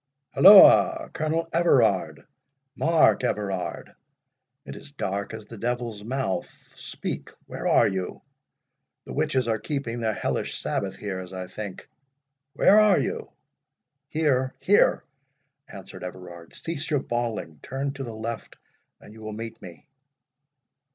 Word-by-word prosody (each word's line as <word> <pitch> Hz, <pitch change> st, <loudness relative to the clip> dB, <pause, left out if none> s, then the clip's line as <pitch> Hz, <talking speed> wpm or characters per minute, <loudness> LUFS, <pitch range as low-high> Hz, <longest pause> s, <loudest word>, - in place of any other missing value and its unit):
— 140 Hz, -, -49 dB
holloa!—Colonel 165 Hz, -4 st, +6 dB
Everard—Mark 140 Hz, -, +1 dB
Everard—it 95 Hz, -, -6 dB
is 145 Hz, -, -11 dB
dark 100 Hz, -6 st, -3 dB
as 110 Hz, -1 st, -8 dB
the 115 Hz, -1 st, -11 dB
devil's 120 Hz, -3 st, -3 dB
mouth—speak—where 125 Hz, -4 st, -5 dB
are -, -, +5 dB
you?—The 95 Hz, -1 st, -9 dB
witches 130 Hz, -3 st, 0 dB
are 110 Hz, -1 st, 0 dB
keeping 120 Hz, -1 st, -4 dB
their 110 Hz, -2 st, -1 dB
hellish -, -, -2 dB
sabbath 95 Hz, -1 st, -3 dB
here, 100 Hz, -3 st, -5 dB
as 90 Hz, -1 st, -9 dB
I 95 Hz, 0 st, -5 dB
think.—Where 135 Hz, -, -1 dB
are 210 Hz, -3 st, +5 dB
you?" -, -, -3 dB, 0.8 s
"Here, 135 Hz, -4 st, 0 dB
here!" -, -, +3 dB, 0.7 s
answered -, -, -10 dB
Everard. 90 Hz, -2 st, -10 dB
"Cease 165 Hz, -1 st, -5 dB
your 145 Hz, -4 st, +1 dB
bawling. 110 Hz, -10 st, -4 dB
Turn 135 Hz, +1 st, -4 dB
to 135 Hz, -1 st, -6 dB
the 115 Hz, -3 st, -7 dB
left, 115 Hz, 0 st, -6 dB, 0.4 s
and 105 Hz, -, -15 dB
you 110 Hz, -, -14 dB
will 110 Hz, 0 st, -6 dB
meet 115 Hz, +1 st, -7 dB
me." 85 Hz, -3 st, -12 dB
120 Hz, 115 wpm, -25 LUFS, 100-140 Hz, 0.8 s, holloa!—Colonel